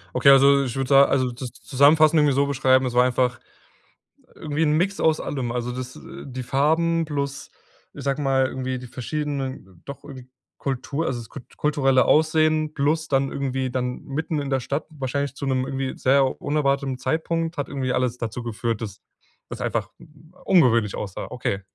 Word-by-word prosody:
Okay, - - +5
also 140 0 +6
ich 120 - -4
würde 135 -1 -2
sa 140 0 +7
also 130 -2 +1
das 125 0 -7
zusammenfassend 155 +4 +4
irgendwie 145 -3 +3
so 140 +1 +3
beschreiben, 130 -1 +2
es 125 - -2
war 125 0 +5
einfach 125 -1 0 0.9
irgendwie 155 +1 -2
'n 150 - +2
Mix 195 +5 0
aus 160 -1 +2
allem. 130 -4 -3
Also 125 0 -3
das, 125 0 -6
äh 170 +1 -10
die 130 -2 -6
Farben 160 +5 +1
plus, 140 -2 -4 0.4
ich - - -9
sage 140 +1 -1
mal, 135 -1 +2
irgendwie 130 0 -4
die 125 - -9
verschiedenen 130 - -5
doch 140 -1 -9
irgend 130 -3 -11 0.3
Kultur 140 +4 -3
also 125 -2 -2
das 115 - -10
kult 130 - -12
kulturelle 135 -3 +2
Aussehen 155 0 +2
plus 155 +3 0
dann 135 0 +1
irgendwie 135 -1 -2
dann 125 0 -3
mitten 155 +2 -3
in 140 -1 -4
der 135 -1 +1
Stadt, 140 +5 -3
wahrscheinlich 140 -2 -3
zu 140 - -5
'nem 130 -1 0
irgendwie 135 -1 -3
sehr 135 0 +2
unerwarteten 140 -3 0
Zeitpunkt, 165 +5 -2
hat 145 - -2
irgendwie 130 -3 -2
alles 125 -1 0
dazu 115 0 -4
geführt, 115 -1 -3
dass 100 -3 -7 0.5
das - - -7
einfach - - -2 0.6
ungewöhnlich 115 - +3
aussah. 100 -3 -5
Okay. 100 -5 -3
135 Hz, 180 wpm, -23 LUFS, 125-150 Hz, 0.9 s, sa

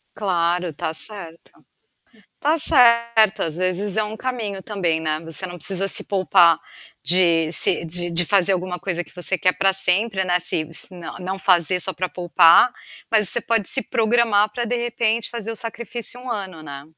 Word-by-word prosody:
Claro, 180 -3 -1
está 160 0 -4
certo. 170 -1 -8 0.9
Está 310 +3 +2
certo, 235 -7 +4
às 160 0 -3
vezes, 185 +3 -1
é 215 - +2
um 215 +1 -5
caminho 220 -6 -4
também, 180 -7 -1
né, 155 -1 -2
você 165 +3 -5
não 175 0 -9
precisa 190 +4 -3
se - - -1
poupar 175 -4 +3 0.5
de 165 0 +2
se 170 - +2
de 175 +1 -5
de 170 +1 +1
fazer 195 +1 +3
alguma 180 -1 -3
coisa 175 -2 -3
que - - -19
você 180 +1 -3
quer 185 -2 +2
para 195 0 +1
sempre, 190 +1 0
né, 180 0 +1
se 165 -2 -1
se - - -9 0.3
não 190 +1 -4
fazer 180 -1 +2
só 190 - -3
para 185 +1 -3
poupar, 175 +6 +4 0.4
mas 215 -3 +4
você - - +1
pode 225 -4 -1
se 265 - +3
programar 225 -3 +2
para, 240 +1 -3
de 240 +1 -2
repente, 235 -1 -1
fazer 230 -1 -5
o - - -9
sacrifício 235 +2 -7
1 255 - -10
ano, 190 -7 -6
né? 140 -1 -9
190 Hz, 180 wpm, -21 LUFS, 175-220 Hz, 0.9 s, certo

